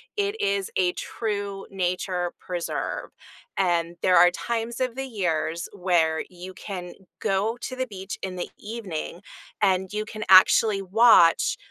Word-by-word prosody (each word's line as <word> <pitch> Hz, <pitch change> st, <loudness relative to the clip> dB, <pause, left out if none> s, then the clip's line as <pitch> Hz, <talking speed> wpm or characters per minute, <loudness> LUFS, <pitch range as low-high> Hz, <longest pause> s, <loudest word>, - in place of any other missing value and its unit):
It 410 Hz, +1 st, -1 dB
is 200 Hz, -1 st, 0 dB
a 180 Hz, -1 st, +2 dB
true 200 Hz, -3 st, -4 dB
nature 180 Hz, -1 st, -2 dB
preserve, 175 Hz, -2 st, -4 dB, 0.5 s
and 170 Hz, -2 st, +1 dB
there 185 Hz, -, +4 dB
are 175 Hz, +1 st, +7 dB
times 235 Hz, +4 st, -3 dB
of 255 Hz, -2 st, -1 dB
the 270 Hz, 0 st, -3 dB
years 170 Hz, -7 st, -2 dB
where 170 Hz, -4 st, +1 dB
you 180 Hz, +1 st, -10 dB
can 180 Hz, -3 st, -7 dB, 0.3 s
go 215 Hz, +3 st, 0 dB
to 255 Hz, -, -5 dB
the 260 Hz, 0 st, -2 dB
beach 195 Hz, -3 st, -7 dB
in 185 Hz, -1 st, -4 dB
the 175 Hz, -, -4 dB
evening 200 Hz, -6 st, -6 dB, 0.4 s
and 190 Hz, -2 st, +2 dB
you 215 Hz, 0 st, -2 dB
can 215 Hz, 0 st, -6 dB
actually 195 Hz, +2 st, +6 dB
watch 225 Hz, -, +5 dB
195 Hz, 145 wpm, -25 LUFS, 180-220 Hz, 0.5 s, are